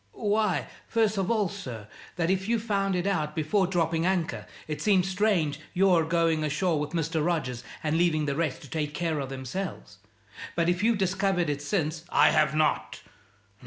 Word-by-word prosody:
"Why, 210 Hz, -2 st, 0 dB, 0.2 s
first 220 Hz, -3 st, +1 dB
of 190 Hz, -, -1 dB
all, 215 Hz, -4 st, +2 dB
sir, 125 Hz, -, -7 dB, 0.3 s
that 170 Hz, 0 st, +1 dB
if 190 Hz, +2 st, -1 dB
you 235 Hz, -, +3 dB
found 200 Hz, -3 st, 0 dB
it 180 Hz, 0 st, -1 dB
out 155 Hz, -7 st, -1 dB
before 175 Hz, +5 st, +1 dB
dropping 165 Hz, -3 st, 0 dB
anchor, 165 Hz, -, -1 dB, 0.2 s
it 150 Hz, -1 st, -4 dB
seems 190 Hz, -3 st, +3 dB
strange 185 Hz, -7 st, +1 dB, 0.2 s
your 180 Hz, -3 st, +4 dB
going 165 Hz, -1 st, +1 dB
ashore 155 Hz, +2 st, 0 dB
with 150 Hz, +2 st, -4 dB
Mr. 165 Hz, -1 st, 0 dB
Rogers 140 Hz, -8 st, -1 dB, 0.2 s
and 155 Hz, +1 st, +1 dB
leaving 160 Hz, -3 st, +2 dB
the 140 Hz, -1 st, -1 dB
rest 155 Hz, -3 st, -2 dB
to -, -, -10 dB
take 150 Hz, -2 st, -2 dB
care 165 Hz, -3 st, -1 dB
of 135 Hz, -2 st, -4 dB
themselves. 130 Hz, -, -6 dB, 0.6 s
But 170 Hz, 0 st, +2 dB
if 175 Hz, +2 st, 0 dB
you've 225 Hz, 0 st, +3 dB
discovered 190 Hz, -3 st, +1 dB
it 145 Hz, 0 st, -4 dB
since 160 Hz, -1 st, -1 dB
" -, -, -28 dB
"I -, -, +5 dB
have 155 Hz, -1 st, +2 dB
not. 75 Hz, -, 0 dB
170 Hz, 185 wpm, -27 LUFS, 150-190 Hz, 0.6 s, I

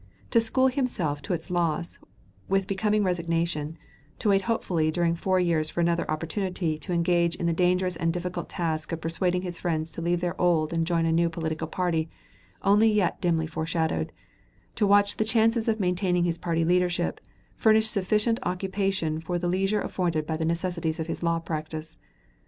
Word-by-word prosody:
To 230 Hz, -, +5 dB
school 260 Hz, +4 st, +2 dB
himself 245 Hz, -, 0 dB
to 195 Hz, -, -3 dB
its 165 Hz, +1 st, -4 dB
loss 170 Hz, -1 st, -1 dB, 0.5 s
with 195 Hz, 0 st, +2 dB
becoming 210 Hz, +2 st, +1 dB
resignation, 165 Hz, -3 st, -1 dB, 0.4 s
to 210 Hz, -, 0 dB
wait 195 Hz, -1 st, +4 dB
hopefully 170 Hz, -8 st, +1 dB
during 170 Hz, +1 st, +1 dB
four 185 Hz, +2 st, +1 dB
years 165 Hz, -3 st, +1 dB
for -, -, -5 dB
another 170 Hz, 0 st, +1 dB
opportunity, 165 Hz, 0 st, -2 dB
to 155 Hz, -, -7 dB
engage 170 Hz, 0 st, +2 dB
in 175 Hz, -, -3 dB
the 170 Hz, -, +2 dB
dangerous 180 Hz, 0 st, +1 dB
and 165 Hz, 0 st, +1 dB
difficult 175 Hz, 0 st, -4 dB
task 160 Hz, -4 st, -2 dB
of 165 Hz, -, -2 dB
persuading 180 Hz, +3 st, -1 dB
his 175 Hz, -2 st, -5 dB
friends 160 Hz, -2 st, -1 dB
to -, -, -7 dB
leave 175 Hz, +1 st, +1 dB
their 175 Hz, +1 st, -3 dB
old 170 Hz, -3 st, +2 dB
and 165 Hz, -1 st, 0 dB
join 170 Hz, -2 st, +1 dB
a 165 Hz, -, +2 dB
new 170 Hz, +1 st, +3 dB
political 160 Hz, -1 st, -3 dB
party 165 Hz, -3 st, -1 dB, 0.5 s
only 210 Hz, +3 st, +5 dB
yet 205 Hz, -4 st, +1 dB
dimly 165 Hz, -2 st, +1 dB
foreshadowed, 160 Hz, -, -1 dB, 0.6 s
to 210 Hz, -, +1 dB
watch 205 Hz, 0 st, +4 dB
the -, -, +2 dB
chances 225 Hz, +1 st, +2 dB
of 220 Hz, -1 st, +1 dB
maintaining 180 Hz, -1 st, +1 dB
his 170 Hz, -1 st, -1 dB
party 165 Hz, -1 st, 0 dB
leadership, 180 Hz, 0 st, +1 dB, 0.3 s
furnished 220 Hz, 0 st, +4 dB
sufficient 215 Hz, +3 st, +1 dB
occupation 185 Hz, -4 st, -1 dB
for 175 Hz, +2 st, -2 dB
the 175 Hz, 0 st, -2 dB
leisure 195 Hz, +4 st, +1 dB
afforded 165 Hz, -4 st, -1 dB
by 160 Hz, -, -2 dB
the 160 Hz, 0 st, -2 dB
necessities 170 Hz, -1 st, -1 dB
of 160 Hz, -, -1 dB
his 165 Hz, -, -5 dB
law 170 Hz, -1 st, +1 dB
practice. 155 Hz, -1 st, -5 dB
175 Hz, 180 wpm, -26 LUFS, 165-190 Hz, 0.6 s, To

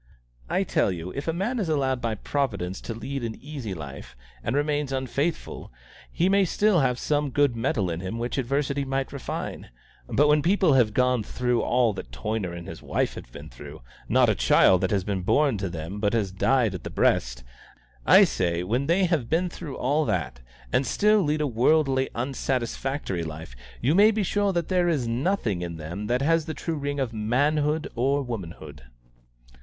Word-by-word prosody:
I -, -, +1 dB
tell -, -, +1 dB
you, 90 Hz, 0 st, -5 dB
if 140 Hz, -, -6 dB
a -, -, +2 dB
man 205 Hz, +9 st, -2 dB
is 190 Hz, -6 st, -1 dB
allowed 135 Hz, -4 st, 0 dB
by 115 Hz, -1 st, -1 dB
Providence 100 Hz, -9 st, -2 dB
to 115 Hz, -, -5 dB
lead 135 Hz, +3 st, -5 dB
an 115 Hz, -1 st, -3 dB
easy 135 Hz, -9 st, -6 dB
life, 70 Hz, -4 st, -9 dB, 0.3 s
and 130 Hz, -, -1 dB
remains 145 Hz, -1 st, 0 dB
unfaithful, 135 Hz, -, -3 dB, 0.4 s
he 175 Hz, -, +1 dB
may 195 Hz, +1 st, +4 dB
still 200 Hz, +1 st, +2 dB
have 125 Hz, -3 st, +1 dB
some 145 Hz, +1 st, 0 dB
good 140 Hz, -1 st, +2 dB
metal 115 Hz, -6 st, 0 dB
in 80 Hz, -, -3 dB
him 95 Hz, +5 st, -4 dB
which 120 Hz, +3 st, -2 dB
adversity 140 Hz, +2 st, -1 dB
might 135 Hz, 0 st, -2 dB
refine; 140 Hz, -, -5 dB, 0.4 s
but 150 Hz, +2 st, +3 dB
when 150 Hz, 0 st, +4 dB
people 185 Hz, -1 st, +3 dB
have 120 Hz, -5 st, +3 dB
gone 125 Hz, -2 st, +3 dB
through 125 Hz, +3 st, -1 dB
all 120 Hz, -3 st, +2 dB
that 95 Hz, -, -8 dB
Toyner 95 Hz, -, -3 dB
and 85 Hz, +1 st, -8 dB
his 80 Hz, -3 st, -8 dB
wife -, -, -1 dB
have -, -, -10 dB
been -, -, -10 dB
through -, -, -11 dB, 0.3 s
not -, -, +4 dB
a -, -, +3 dB
child 95 Hz, -, +4 dB
that 95 Hz, -, +1 dB
has 100 Hz, -3 st, 0 dB
been 100 Hz, -1 st, -2 dB
born 135 Hz, +3 st, +2 dB
to 95 Hz, -2 st, -2 dB
them 85 Hz, +4 st, -6 dB
but 105 Hz, 0 st, +1 dB
has 105 Hz, -5 st, 0 dB
died 115 Hz, +2 st, +2 dB
at 90 Hz, -, -6 dB
the -, -, -5 dB
breast 60 Hz, 0 st, +1 dB, 0.6 s
I -, -, +7 dB
say, 85 Hz, +8 st, 0 dB
when 120 Hz, +9 st, -1 dB
they 180 Hz, +3 st, +3 dB
have 160 Hz, -9 st, 0 dB
been 175 Hz, +3 st, +1 dB
through 160 Hz, -5 st, -7 dB
all 145 Hz, +4 st, +1 dB
that, 65 Hz, -, -2 dB, 0.3 s
and 130 Hz, -, +3 dB
still 210 Hz, 0 st, +3 dB
lead 150 Hz, -2 st, 0 dB
a -, -, +1 dB
worldly, 135 Hz, +2 st, +2 dB
unsatisfactory 130 Hz, -, -2 dB
life, 80 Hz, -5 st, -8 dB, 0.3 s
you 140 Hz, -, +2 dB
may 205 Hz, +4 st, +7 dB
be 220 Hz, -1 st, 0 dB
sure 205 Hz, +1 st, +1 dB
that 170 Hz, -3 st, -1 dB
there 180 Hz, -2 st, +2 dB
is 140 Hz, -8 st, 0 dB
nothing 120 Hz, -, 0 dB
in 85 Hz, -1 st, -5 dB
them 85 Hz, +7 st, -6 dB
that 125 Hz, +3 st, +1 dB
has 165 Hz, +1 st, +2 dB
the 160 Hz, -, -4 dB
true 165 Hz, -, -3 dB
ring 145 Hz, 0 st, -3 dB
of 130 Hz, -4 st, -2 dB
manhood 145 Hz, +8 st, +1 dB
or 135 Hz, +4 st, +1 dB
womanhood." 95 Hz, -, -7 dB
130 Hz, 195 wpm, -25 LUFS, 100-150 Hz, 0.6 s, I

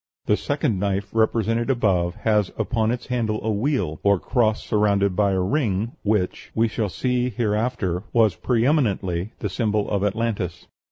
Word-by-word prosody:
The 105 Hz, -, +3 dB
second 140 Hz, -, -1 dB
knife 100 Hz, +1 st, -1 dB
represented 115 Hz, +1 st, +1 dB
above 95 Hz, -8 st, +1 dB
has 105 Hz, -2 st, +1 dB
upon 110 Hz, 0 st, 0 dB
its 120 Hz, 0 st, -2 dB
handle 115 Hz, -4 st, -1 dB
a 110 Hz, -, 0 dB
wheel, 105 Hz, -, -1 dB
or 100 Hz, -2 st, +3 dB
cross 110 Hz, -2 st, +1 dB
surrounded 100 Hz, -2 st, +1 dB
by 100 Hz, 0 st, +2 dB
a 95 Hz, -, +1 dB
ring, 105 Hz, 0 st, 0 dB
which, 105 Hz, -3 st, -1 dB
we 115 Hz, +1 st, +3 dB
shall 110 Hz, -1 st, -2 dB
see 125 Hz, +4 st, 0 dB
here 110 Hz, -2 st, -1 dB
after, 105 Hz, -6 st, -1 dB
was 115 Hz, -3 st, +4 dB
pre 120 Hz, -2 st, 0 dB
eminently 100 Hz, -, 0 dB
the 105 Hz, -, -1 dB
symbol 105 Hz, +1 st, 0 dB
of 100 Hz, -1 st, 0 dB
Atlantis. 105 Hz, -4 st, -2 dB
105 Hz, 165 wpm, -23 LUFS, 100-115 Hz, -, was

